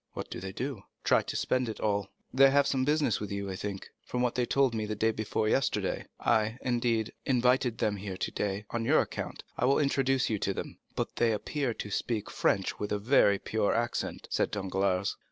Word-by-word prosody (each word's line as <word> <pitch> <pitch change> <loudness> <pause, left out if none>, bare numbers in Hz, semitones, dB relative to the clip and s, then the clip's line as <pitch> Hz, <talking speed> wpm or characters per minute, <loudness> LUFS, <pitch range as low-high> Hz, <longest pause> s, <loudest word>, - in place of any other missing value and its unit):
"What - - -6
do - - -4
they 95 +1 -5
do?" 130 +1 -4 0.2
"Try - - +4
to - - -6
spend 130 -2 0
it 110 - -6
all. 100 -2 0 0.2
They 135 +1 +7
have 140 +1 +4
some 130 -1 +1
business 145 -3 +2
with 105 -1 -5
you, 100 -1 -3
I - - -4
think, 100 0 -5 0.2
from 125 0 -2
what 125 - +1
they 125 -1 0
told 135 -3 +3
me 110 -1 -2
the 105 - -2
day 110 +2 +2
before 110 0 -1
yesterday. 135 +4 0
I, 110 +1 +2
indeed, 120 -3 0
invited 125 -2 +2
them 105 -1 0
here 95 -1 -5
today 100 +1 -2
on 115 -1 -1
your 145 +7 +4
account. - - -5 0.2
I - - +3
will 135 +2 +4
introduce 135 -2 +2
you 110 -2 -1
to 95 0 -1
them." - - -6 0.2
"But - - -3
they 120 -1 +3
appear 125 +3 -2
to 105 - -6
speak 110 +1 -2
French 95 -1 0
with 105 - -3
a 105 - +2
very 100 -2 +4
pure 105 0 0
accent," 120 +1 -2
said - - +1
Danglars. 95 -1 0
110 Hz, 210 wpm, -30 LUFS, 100-125 Hz, 0.2 s, They